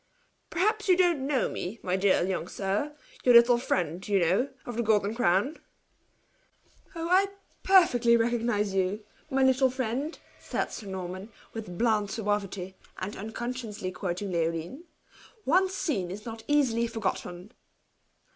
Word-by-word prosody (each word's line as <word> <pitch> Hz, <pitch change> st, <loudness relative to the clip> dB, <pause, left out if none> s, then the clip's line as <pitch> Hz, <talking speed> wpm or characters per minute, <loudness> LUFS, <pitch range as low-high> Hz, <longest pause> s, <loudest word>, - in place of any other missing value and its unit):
"Perhaps 420 Hz, +5 st, 0 dB
you 365 Hz, -, +6 dB
don't 340 Hz, -7 st, +2 dB
know 280 Hz, -3 st, +1 dB
me, 200 Hz, +6 st, -5 dB
my 180 Hz, 0 st, 0 dB
dear 190 Hz, -2 st, +3 dB
young 185 Hz, -2 st, -2 dB
sir 205 Hz, +11 st, -2 dB, 0.3 s
your 245 Hz, -1 st, +6 dB
little 235 Hz, 0 st, +7 dB
friend, 180 Hz, -6 st, -2 dB
you 205 Hz, -1 st, +2 dB
know, 190 Hz, +10 st, +2 dB, 0.2 s
of 245 Hz, -, -6 dB
the 235 Hz, -, 0 dB
Golden 210 Hz, -2 st, +2 dB
Crown." 225 Hz, -, +1 dB, 1.4 s
"Oh, 330 Hz, 0 st, -3 dB
I 375 Hz, +3 st, +4 dB, 0.3 s
perfectly 245 Hz, -12 st, +5 dB
recognize 230 Hz, -3 st, 0 dB
you! 195 Hz, +2 st, 0 dB, 0.3 s
My 270 Hz, -2 st, +2 dB
little 260 Hz, 0 st, +4 dB
friend," 260 Hz, +4 st, -3 dB, 0.2 s
said -, -, -3 dB
Sir 210 Hz, -, -7 dB
Norman, 185 Hz, +1 st, -6 dB, 0.2 s
with 210 Hz, -6 st, -7 dB
bland 215 Hz, -3 st, +2 dB
suavity, 200 Hz, -3 st, -2 dB, 0.2 s
and 190 Hz, +3 st, -5 dB
unconsciously 220 Hz, -2 st, -5 dB
quoting 185 Hz, +1 st, -4 dB
Leoline, 170 Hz, -, -2 dB, 0.6 s
"once 375 Hz, +5 st, +3 dB
seen 245 Hz, -, -1 dB
in 190 Hz, +3 st, -5 dB
not 225 Hz, -1 st, -7 dB
easy 290 Hz, -5 st, +3 dB
to -, -, +2 dB
be 235 Hz, -, +1 dB
forgotten." 195 Hz, -3 st, -4 dB
225 Hz, 145 wpm, -28 LUFS, 190-265 Hz, 1.4 s, little